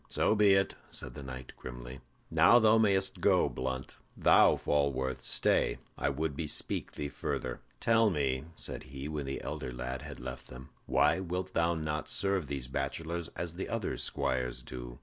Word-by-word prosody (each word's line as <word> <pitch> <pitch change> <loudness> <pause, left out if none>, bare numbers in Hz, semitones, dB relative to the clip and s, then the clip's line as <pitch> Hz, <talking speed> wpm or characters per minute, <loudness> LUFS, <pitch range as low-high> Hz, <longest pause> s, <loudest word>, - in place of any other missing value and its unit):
"So - - +2
be 105 -2 +5
it," 95 0 +2 0.2
said - - -4
the 75 - -8
knight, 65 -1 -8
grimly. 60 +1 -8 0.3
"Now 120 - +7
thou 110 -1 +5
mayst 100 -3 +2
go, - - +4
Blunt. 65 0 -4 0.2
Thou, - - +6
Falworth, 65 -3 0
stay; - - +2 0.2
I 70 - 0
would 70 +1 -2
bespeak 75 0 -1
thee 75 - -3
further." - - -4 0.2
"Tell 115 -1 +4
me," 70 -5 0
said - - -5
he, 70 +1 -6
when 75 -2 -4
the 70 - -4
elder - - -4
lad 60 +2 -4
had 75 -1 -8
left 65 0 -7
them, 65 +1 -11 0.2
"why - - +3
wilt 90 0 -3
thou 85 +1 +2
not 75 -1 -3
serve 95 -5 +1
these 70 -3 -2
bachelors 80 +5 -3
as 85 -1 -3
the 95 - -5
other 115 -4 -2
squires 60 -1 -1
do? - - -8
70 Hz, 170 wpm, -31 LUFS, 65-90 Hz, 0.3 s, Now